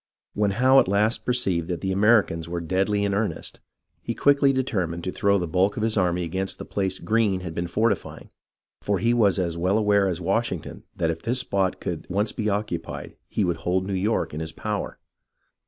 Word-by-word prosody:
When 105 -1 +1
Howe 130 +2 +6
at - - +3
last 105 +4 +1
perceived 95 -10 0
that 90 -2 -3
the 95 - -1
Americans 100 -5 +3
were 85 0 -2
deadly 95 +4 0
in 100 - 0
earnest, 105 +1 -3 0.4
he - - -4
quickly 140 -1 +4
determined 95 -11 -1
to 95 - -2
throw 100 0 +2
the 90 -2 -2
bulk 95 +5 +1
of 110 - -1
his 110 -1 0
army 90 -3 +1
against 95 +3 -3
the - - -7
place 95 -2 -2
Greene 110 -4 +1
had 85 -3 -6
been 85 +1 -3
fortifying, 105 +3 -1 0.5
for 100 -1 0
he 115 +6 +2
was 105 -5 +3
as 85 -3 -1
well 95 +4 +2
aware 105 -2 +3
as 90 -2 -2
Washington 95 -1 -2
that 80 - 0
if 80 - -6
this 120 +4 0
spot 95 -5 -1
could 85 -3 -5
once 100 +4 0
be 110 -2 -2
occupied 100 -5 -4
he 105 - 0
would 85 -2 0
hold 90 +3 -1
New 100 - -3
York 95 0 0
in 75 - -4
his 80 0 -4
power. - - -4
95 Hz, 205 wpm, -24 LUFS, 90-105 Hz, 0.5 s, Howe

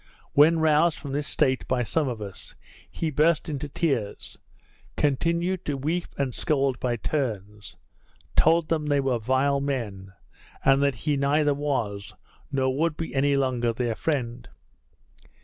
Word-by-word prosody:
When 155 +3 +6
roused 160 +1 +3
from 140 - -7
this 145 +1 -2
state 130 -3 +1
by 125 -1 +1
some 150 +5 0
of 115 -4 -4
us, 100 -2 -9 0.3
he 160 -2 -3
burst 155 +2 +2
into 145 -1 -4
tears; 135 -10 -2 0.6
continued 170 +6 0
to 145 -2 -1
weep 160 +6 -1
and 135 -3 -1
scold 135 -3 0
by 120 -2 0
turns; 105 -7 -4 0.6
told 165 0 +4
them 155 -2 0
they 145 -1 +2
were 130 -3 0
vile 130 +4 +1
men; 105 -9 -4 0.5
and 135 0 +5
that 140 -2 +2
he 150 -2 +2
neither 145 +2 +2
was, 120 -9 -3 0.4
nor 130 -1 +1
would 160 +1 0
be 165 - -5
any 140 +1 +2
longer 125 -4 +1
their 120 0 -1
friend. 120 -3 -3
140 Hz, 150 wpm, -26 LUFS, 125-150 Hz, 0.6 s, When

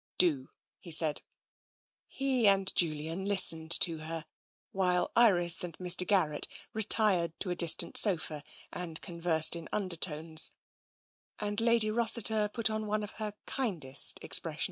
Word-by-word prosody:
" - - -71
Do," 150 -8 +1 0.3
he 180 - -14
said. 155 -2 +3 0.9
He 260 -5 -1
and 195 -1 +1
Julian 160 +2 -2
listened 175 -5 +3
to 165 -3 +2
her, 160 +1 -6 0.5
while 180 -2 -1
Iris 180 -7 +3
and 170 -3 -8
Mr. 180 0 +1
Garrett 160 -7 -1 0.3
retired 205 -6 0
to 185 - -3
a - - -3
distant 170 -2 +2
sofa 160 -7 +2 0.3
and 165 -3 -7
conversed 170 -2 +1
in 165 -1 -10
un 200 -3 -3
dertones, 160 -2 +2 0.9
and 205 +1 -4
Lady 230 -2 +1
Rossiter 220 -2 +1
put 230 -1 0
on 215 0 -5
one 210 0 -3
of 210 - -8
her 210 -1 -5
kindest 165 - 0
expressions. - - 0
180 Hz, 145 wpm, -29 LUFS, 165-210 Hz, 0.9 s, said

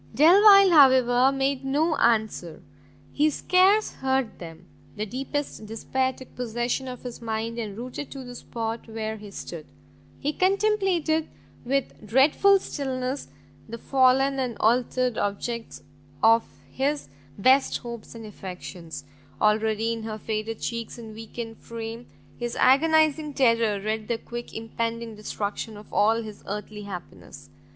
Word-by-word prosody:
Delvile, 395 +5 +8
however, 260 -4 +6
made 270 0 -1
no 300 +4 +1
answer; 220 -8 0 0.5
he 300 +1 +3
scarce 375 +7 +3
heard 265 -3 -1
them: 165 0 -10 0.3
the 210 0 -3
deepest 270 0 -4
despair 260 +4 -1
took 260 0 -14
possession 240 +2 -2
of 250 -1 -7
his 245 -2 -7
mind, 225 +1 -3
and, 210 -3 -5
rooted 255 +4 -6
to 270 -1 -8
the 245 -1 -9
spot 230 -1 -5
where 220 0 -4
he 210 -1 -10
stood, 170 -5 -8 0.5
he 295 +2 -1
contemplated 375 -5 +1 0.4
iii 275 0 +2 0.2
dreadful 280 - +5
stillness 265 -5 -4 0.4
the 230 - -5
fallen 270 +2 +3
and 250 -4 -2
altered 245 +1 +1
object 225 +3 -3 0.4
of 225 +1 +6 0.3
his 285 +2 -1 0.3
best 260 +6 +4
hopes 235 -1 -9
and 225 -1 -8
affections; 180 -6 -8 0.4
already 220 +1 +2
in 230 - -5
her 220 -1 -5
faded 220 +1 -4
cheeks 230 -1 -4
and 225 -2 -9
weakened 225 +1 -7
frame, 230 +1 -7 0.3
his 240 -1 -3
agonising 310 +1 +3
terror 230 -5 +3
read 215 +1 -3
the 235 - 0
quick 240 +1 -8
impending 230 0 -4
destruction 210 +1 -4
of 210 - -14
all 225 +2 +3
his 215 -2 -10
earthly 210 +1 -5
happiness! 90 - -10
235 Hz, 135 wpm, -25 LUFS, 220-270 Hz, 0.5 s, Delvile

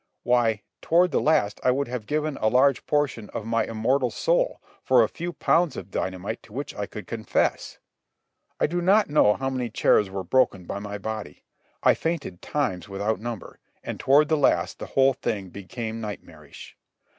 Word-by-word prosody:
Why, 115 -4 +2 0.2
toward 175 +2 +3
the - - +1
last 105 -10 +1
I - - +3
would 140 +2 +1
have 120 -3 -5
given 155 -1 -1
a 110 - +3
large 130 +2 +3
portion 145 -7 0
of 110 - -4
my 115 0 +1
immortal 125 +4 0
soul - - 0 0.2
for - - +5
a - - +2
few 175 +1 -5
pounds 170 -2 +1
of 95 +1 -8
dynamite 95 +4 -3
to 105 - -18
which 140 +4 -5
I 100 - -4
could 105 - -8
confess. 115 -2 -1 0.8
I - - +3
do 175 +3 -1
not 195 -1 +3
know 105 -8 +5
how 135 0 -2
many 125 -2 -2
chairs 105 -2 +3
were 95 0 -4
broken 95 -2 +1
by 100 - -4
my 105 0 -6
body. 105 -6 -6 0.4
I - - +6
fainted 155 - -3
times 95 - -2
without 100 +3 -1
number, 115 -4 -7 0.2
and - - -5
toward 145 +3 +4
the 155 - +2
last 145 - +1
the - - -6
whole 135 0 +3
thing 100 -5 -3
became 110 +4 -6
nightmarish. 105 -3 -9
120 Hz, 180 wpm, -25 LUFS, 105-145 Hz, 0.8 s, I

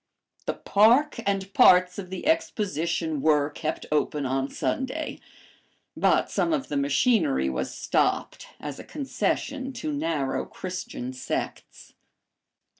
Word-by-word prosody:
The - - -1
park 240 +9 +4
and 195 -1 -1
parts 180 +1 +6
of 185 -2 -7
the 190 -1 -6
Exposition 170 - 0
were 150 -1 +3
kept 155 +2 -4
open 150 -1 0
on 135 +1 -1
Sunday, 265 +4 -3 0.8
but - - +2
some 335 - +1
of 275 -4 -2
the 145 - -2
machinery 140 - +2
was 65 - -3
stopped - - 0
as 145 -2 -6
a - - -7
concession 275 -1 -2
to 155 -11 -4
narrow 145 -2 -1
Christian 180 -9 -6
sects. 130 - -5
170 Hz, 120 wpm, -26 LUFS, 145-230 Hz, 0.8 s, parts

